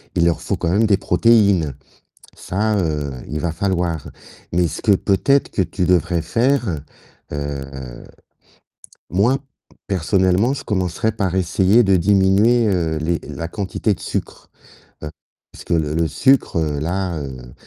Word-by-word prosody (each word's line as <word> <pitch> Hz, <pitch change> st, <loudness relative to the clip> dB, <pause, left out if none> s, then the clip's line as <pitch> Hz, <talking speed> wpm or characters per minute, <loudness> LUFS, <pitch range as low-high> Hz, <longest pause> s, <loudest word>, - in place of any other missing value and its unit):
il 85 Hz, -, +3 dB
leur 85 Hz, -1 st, +1 dB
faut -, -, -2 dB
quand 85 Hz, -, -1 dB
même 105 Hz, +6 st, +3 dB
des 100 Hz, -2 st, +3 dB
protéines. 100 Hz, -5 st, +3 dB, 0.6 s
Ça, 105 Hz, +3 st, -1 dB
heu, 75 Hz, -5 st, -2 dB, 0.2 s
il 75 Hz, -, -3 dB
va 85 Hz, -2 st, -1 dB
falloir, 85 Hz, -3 st, -2 dB, 0.4 s
mais 90 Hz, 0 st, +2 dB
ce -, -, -6 dB
que 105 Hz, -, +4 dB
peut-être 105 Hz, +9 st, +2 dB
que -, -, -2 dB
tu 90 Hz, +1 st, -2 dB
devrais 90 Hz, -1 st, +1 dB
faire, 115 Hz, -, 0 dB, 0.5 s
heu, 70 Hz, -1 st, -4 dB, 1.5 s
moi 110 Hz, +9 st, +2 dB, 0.5 s
personnellement, 95 Hz, +5 st, +2 dB
je -, -, -6 dB
commencerais 95 Hz, +2 st, -1 dB
par 95 Hz, -4 st, -1 dB
essayer 95 Hz, +5 st, +3 dB
de 100 Hz, -2 st, +3 dB
diminuer, 100 Hz, +5 st, +3 dB
heu, 85 Hz, -5 st, 0 dB
les 85 Hz, +2 st, -1 dB
la 85 Hz, -, -5 dB
quantité 100 Hz, +2 st, -1 dB
de -, -, -9 dB
sucre, -, -, -5 dB, 0.5 s
heu, 75 Hz, -, -4 dB, 0.4 s
parce -, -, -11 dB
que -, -, -1 dB
le 75 Hz, -3 st, 0 dB
le 85 Hz, 0 st, +1 dB
sucre 135 Hz, -4 st, +2 dB
là, 80 Hz, +4 st, -2 dB
heu, 65 Hz, -4 st, -8 dB
90 Hz, 145 wpm, -20 LUFS, 80-105 Hz, 1.5 s, que